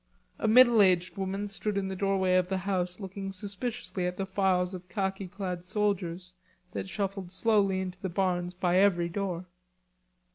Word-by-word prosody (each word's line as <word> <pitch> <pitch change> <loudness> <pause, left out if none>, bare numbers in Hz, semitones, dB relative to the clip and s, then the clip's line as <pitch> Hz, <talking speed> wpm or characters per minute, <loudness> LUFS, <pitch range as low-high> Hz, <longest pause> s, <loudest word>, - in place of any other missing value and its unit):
A - - 0
middle 240 0 +7
aged 185 -2 +3
woman 195 +1 -2
stood 200 +1 -3
in 195 -1 0
the 190 - -4
doorway 190 -1 +1
of 185 0 +3
the 190 - 0
house 185 -1 -2
looking 195 0 -5
suspiciously 195 -1 -4
at 180 0 -4
the 195 - -1
files 190 -1 +1
of 180 -1 -8
khaki 195 -2 -2
clad 180 -1 -5
soldiers 185 -2 -1 0.4
that 190 - -4
shuffled 195 -2 -3
slowly 195 -1 +2
into 185 -1 -6
the 190 - -2
barns 180 0 -1
by 180 0 +1
every 180 -3 +3
door. 180 -1 -3
190 Hz, 170 wpm, -29 LUFS, 180-200 Hz, 0.4 s, middle